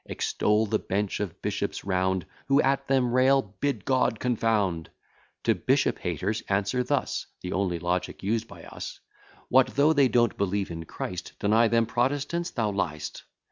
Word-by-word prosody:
Extol 105 +1 +1
the 105 - 0
bench 100 +1 -2
of 100 -5 -4
bishops - - -2
round, 95 -1 0 0.2
Who 140 0 +4
at 135 0 +1
them 130 -3 +2
rail, 130 +2 +5 0.2
bid 145 -1 -1
confound; 115 -8 +1 0.5
To - - +4
bishop - - +1
haters 105 +4 -2
answer 100 +6 +1
thus: 140 +2 -1
(The 90 - -4
only 95 -3 0
logic 90 +3 -2
used 115 +3 0
by - - -12
us) - - -8 0.5
What 130 0 +4
though 150 +3 +5
they 140 -3 +5
don't 120 -2 +2
believe 100 -1 -1
in 80 -1 -6 0.5
Deny 110 +3 +4
them 115 0 +3
Protestants 140 +8 -1
thou 110 -8 -1
lyest. 80 -6 -3
110 Hz, 150 wpm, -27 LUFS, 95-130 Hz, 0.5 s, rail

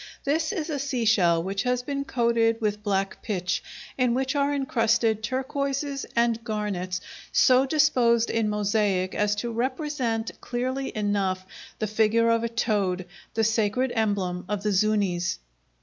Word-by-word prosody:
This 315 +4 0
is 330 -6 -3
a 285 - -2
seashell 220 -11 +2
which 195 +2 -2
has 250 0 0
been 280 +1 -3
coated 235 -5 +2
with 210 -2 -1
black 195 -2 -1
pitch, 185 -3 -2 0.4
in 250 -2 +3
which 265 +2 -1
are 285 0 +2
encrusted 230 -5 +1
turquoises 275 +3 -2
and 235 -1 +2
garnets 200 -5 -3 0.3
so 260 +1 +5
disposed 250 -6 +3
in 225 -2 +1
mosaic 205 -3 +1
as 210 0 +1
to 235 +3 -3
represent 250 -2 -2
clearly 255 +2 -2
enough 195 -3 0 0.3
the 215 - -1
figure 220 +2 +3
of 230 0 +2
a 235 - -1
toad, 205 -5 0 0.3
the 225 - +2
sacred 220 +3 +1
emblem 200 -5 -1
of 205 -1 -2
the 210 - +1
Zuñis. 195 -3 +1
225 Hz, 145 wpm, -26 LUFS, 205-255 Hz, 0.4 s, so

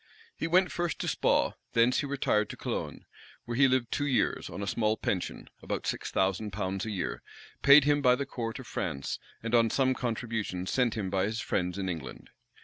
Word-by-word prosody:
He - - -2
went 180 +2 +3
first 175 -1 -2
to - - -3
Spaw, - - +2 0.2
thence 120 +2 +4
he 145 - -2
retired 120 -6 +1
to - - -7
Cologne; - - -4 0.4
where 120 - -4
he 135 +2 +6
lived 130 -2 +1
two 145 - 0
years, 130 - 0
on 100 - -5
a - - -2
small 110 +1 +1
pension, 90 -3 -3
about - - -4
six - - -2
thousand 95 +3 0
pounds 95 +1 -3
a - - -3
year, 95 -4 -3 0.4
paid 140 +1 +8
him 145 0 +3
by 125 -2 +5
the 140 +2 -3
court 115 -4 -4
of 130 - -9
France, 70 -11 -3 0.2
and 115 0 -3
on 115 -1 +5
some 130 +2 +2
contributions 110 -7 -3
sent 125 -3 +2
him 95 -4 -2
by 95 -1 +1
his 110 +2 -2
friends 90 -3 -1
in 95 -1 -2
England. 80 -7 -6
115 Hz, 205 wpm, -29 LUFS, 95-130 Hz, 0.4 s, paid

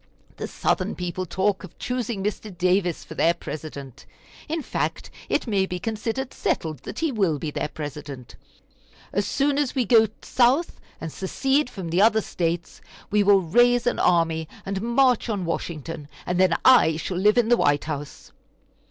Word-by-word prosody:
The - - -4
Southern - - -1
people 180 +1 -4
talk 190 +3 0
of 185 - -12
choosing 240 -5 -3
Mr. 210 -2 -4
Davis 180 -1 +1
for - - -10
their 170 +1 +2
President. 145 -6 -8 0.4
In 320 0 -2
fact, - - -3 0.2
it - - +1
may 200 -5 +1
be 180 - -3
considered 225 +6 -3
settled 155 -4 -2
that - - -8
he 320 -2 0
will 195 - +1
be 150 +1 -4
their - - -2
President. 145 -4 -8 0.8
As 200 +1 0
soon 280 +3 +1
as 290 -2 -1
we 255 -3 +1
go 225 -2 +5 0.2
South 260 +7 +2 0.2
and 165 - -5
secede 270 +8 0
from 190 -8 -6
the 175 +3 +3
other 220 0 +5
States, 170 -2 -3 0.3
we 210 0 +4
will 200 -1 +5
raise 240 +7 +3
an 245 - 0
army 165 -2 +2 0.2
and 195 0 -3
march 245 +1 +2
on 200 -5 -2
Washington, 165 -2 -4 0.2
and 180 0 -1
then 185 -3 +4
I 200 -12 +6
shall 175 +2 -4
live 210 +5 +3
in 235 -2 +3
the 240 - +5
White 145 -6 +2
House." 145 -2 -6
190 Hz, 170 wpm, -24 LUFS, 165-235 Hz, 0.8 s, I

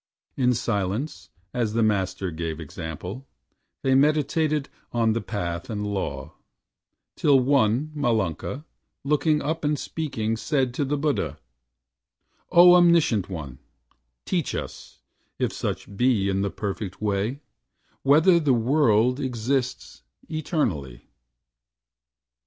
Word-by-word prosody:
In 125 -2 +2
silence, 100 - -2 0.2
as 115 -4 -1
the 115 0 +2
Master 95 -3 0
gave 80 -1 -4
example, 85 - -7 0.6
They 135 - +3
meditated 150 +1 +2 0.2
on 115 -2 +2
the 115 - -1
Path 85 -4 -4
and 105 -2 -3
Law, 75 -9 -4 0.8
Till 140 -3 +4
one, 130 +1 +2
Malunka, 120 - -1 0.4
looking 150 +1 +1
up 160 +3 -2
and 150 0 +1
speaking, 115 -9 -3
Said 130 -1 0
to 140 - -1
the 145 +2 -1
Buddha: 140 - -1 1.1
"O 175 0 +8
Omniscient 170 - +4
One, 70 -8 -7 0.7
Teach - - -1
us, - - -8 0.3
if - - -1
such 100 - -4
be 115 -4 +2
in 95 0 0
the 100 - 0
Perfect 100 -1 -5
Way, 105 +6 -1 0.6
Whether 160 +6 +5
the 145 -6 +3
World 125 -1 +3
exists 125 - -2 0.3
eternally." 105 - -3
120 Hz, 110 wpm, -25 LUFS, 100-145 Hz, 1.1 s, O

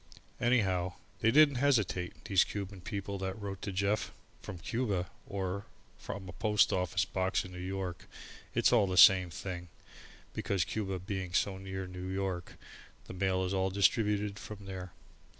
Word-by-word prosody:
Anyhow, 95 -7 +2 0.3
they 110 - +3
didn't 145 +1 +6
hesitate, 110 -10 +1
these 95 -3 +5
Cuban 100 -2 -6
people 100 +1 -4
that 95 +2 -3
wrote 100 -2 -5
to 100 - -3
Jeff 100 +3 0 0.3
from 95 - -7
Cuba 100 -3 -2 0.2
or 100 0 -3 0.3
from 100 -2 -6
a 90 - -8
post 105 0 +3
office 90 0 +1
box 95 +1 0
in 90 - -9
New 90 - -8
York 95 -1 -4 0.5
it's - - +4
all 110 -5 +5
the 95 -1 -2
same 90 -1 +8
thing, 90 +3 -6 0.7
because 95 -4 0
Cuba 95 -3 -2
being 90 -1 -4
so 95 0 +1
near 95 0 -5
to 90 - -10
New 90 0 -6
York 95 -2 -3 0.5
the - - -8
mail 95 0 +1
is 90 - -2
all 95 0 +1
distributed 100 +1 +2
from 100 -1 -9
there. 95 -2 -6
95 Hz, 165 wpm, -32 LUFS, 90-100 Hz, 0.7 s, same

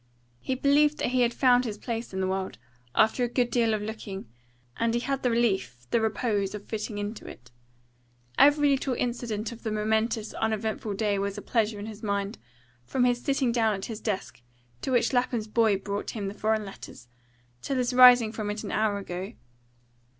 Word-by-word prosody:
He 260 - -2
believed 290 +3 +3
that - - -1
he 255 0 +1
had 240 -1 +3
found 250 -1 +4
his 215 -4 -4
place 230 +1 -4
in 190 0 -3
the 185 - 0
world, 190 0 -3 0.4
after 220 +3 +3
a - - +2
good 245 0 0
deal 230 -2 +2
of 215 -1 -1
looking, 210 - -6 0.5
and 230 0 +1
he - - +2
had 275 +2 -2
the 250 - +1
relief, 195 - 0
the 235 - +3
repose, 210 -2 0
of 205 - -8
fitting 215 -1 -4
into 205 +2 -5
it. 120 0 -12 0.8
Every 290 0 +5
little 265 -1 0
incident 235 -3 -2
of 235 - -10
the 225 - -3
momentous, 220 +1 0
uneventful 220 -1 -2
day 205 -1 0
was 200 +1 -2
a - - -5
pleasure 220 -2 0
in 205 - -6
his 215 -1 -9
mind, 200 0 -2 0.4
from 250 - 0
his 245 -1 +2
sitting 270 -3 +1
down 225 -3 +2
at 190 - -5
his 225 -2 -7
desk, 190 - -4 0.4
to - - -3
which 245 +1 +2
Lapham's 245 -3 0
boy 215 -2 +3
brought 200 +1 -4
him 205 -3 -4
the - - -7
foreign 215 0 0
letters, 195 -9 -11 0.5
till 275 - -2
his 250 0 0
rising 250 -3 +8
from 215 -2 -4
it 210 +1 -4
an - - -5
hour 215 -1 +1
ago. 190 -1 -6
220 Hz, 195 wpm, -27 LUFS, 205-245 Hz, 0.8 s, rising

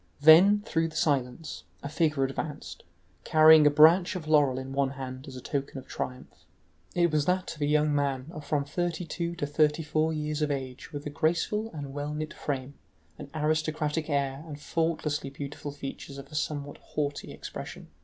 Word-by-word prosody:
Then, 180 +8 +7
through 165 -5 +1
the 160 - -11
silence, 135 0 -1 0.2
a - - -3
figure 155 -1 +1
advanced, 140 +2 -4 0.4
carrying 155 -1 +7
a - - +8
branch 160 +6 +6
of 165 -4 -5
laurel 145 -4 +4
in 130 0 -5
one 140 -1 +1
hand 130 0 -7
as 135 - -9
a 125 - -7
token 140 0 -3
of 130 - -8
triumph. 125 0 -6 0.5
It 175 -1 +3
was 150 -2 +1
that 180 +1 0
of 150 - -13
a 145 - +2
young 150 0 +3
man 140 -3 0
of 155 -3 -8
from 145 -1 0
thirty 175 +3 -2
two 170 0 -3
to 165 -4 -2
thirty 150 +2 +2
four 155 +1 +1
years 150 -1 -2
of 150 - +1
age, 130 0 -5
with 145 -2 -6
a 150 - -4
graceful 175 +8 0
and 145 -3 -7
well 145 +1 -4
knit 155 0 -4
frame, 135 -1 -4 0.5
an 145 - -8
aristocratic 155 0 0
air 140 0 -1
and 150 -2 -8
faultlessly 155 -3 -1
beautiful 140 +1 -6
features 140 0 -7
of 140 +1 -10
a - - -13
somewhat 145 -1 -3
haughty 145 -1 -4
expression. - - -8
150 Hz, 185 wpm, -28 LUFS, 140-160 Hz, 0.5 s, a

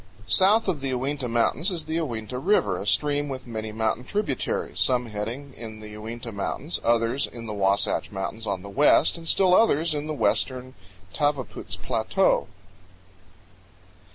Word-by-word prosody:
South 205 - +5
of 165 -7 -1
the 135 - -2
Uinta 130 +1 -1
Mountains 120 - +1
is 175 -4 -5
the 160 - -2
Uinta 125 -6 -3
River, 105 - +2
a 100 - -6
stream 145 +3 +1
with 130 -1 -6
many 110 -2 -5
mountain 110 +2 -1
tributaries, 175 -2 -2
some 125 -1 +3
heading 115 +6 -5
in 110 -2 -8
the 105 0 -9
Uinta 115 +2 -7
Mountains, 110 - -3
others 115 +3 +2
in 115 -1 -9
the 110 - -4
Wasatch 100 +1 +1
Mountains 105 +3 -5
on 95 -2 -2
the - - -8
west, 145 +8 +4
and 165 -1 -7
still 185 +1 +4
others 170 -6 +4
in 150 0 -3
the 155 - -3
western 130 -2 0 0.4
Tavaputs 145 -4 -1
Plateau. - - +1
125 Hz, 155 wpm, -25 LUFS, 110-150 Hz, 0.4 s, South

